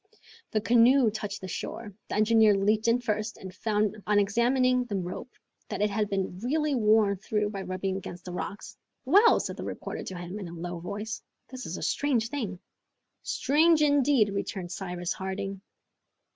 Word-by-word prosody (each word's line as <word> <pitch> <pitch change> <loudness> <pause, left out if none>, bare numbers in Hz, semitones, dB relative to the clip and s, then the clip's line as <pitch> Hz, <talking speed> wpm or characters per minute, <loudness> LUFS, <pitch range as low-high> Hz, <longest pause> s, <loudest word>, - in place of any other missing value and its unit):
The 215 - 0
canoe 235 +2 +5
touched 210 -1 -5
the 190 - -6
shore. 210 +3 -6 0.2
The - - -2
engineer 215 -1 +5
leaped 215 +3 +2
in 235 +2 +3
first, 215 -2 -2
and 190 -1 -9
found, 215 +1 -1
on 210 -1 +3
examining 250 +5 +3
the 215 -4 -4
rope, 185 +6 -4 0.4
that - - -1
it 210 - +1
had 210 0 0
been 190 -2 -2
really 300 +6 0
worn 215 -4 +3
through 210 +2 -1
by 195 -2 -5
rubbing 190 0 -3
against 175 -2 -8
the 180 - -6
rocks. 190 +2 -6 0.3
"Well," 400 - +6
said - - -4
the - - -5
reporter - - -5
to 185 - -6
him, 175 +4 -6
in 195 - -6
a 170 - -9
low 175 +1 -5
voice, 210 +5 -5 0.3
"this 255 -1 -7
is 175 - -4
a - - -6
strange 245 -6 +1
thing." 220 -10 -3 0.6
"Strange 310 +2 +3
indeed!" 285 -6 +4
returned 190 -3 -4
Cyrus 180 -1 -3
Harding. 195 0 -4
210 Hz, 175 wpm, -28 LUFS, 190-240 Hz, 0.6 s, Well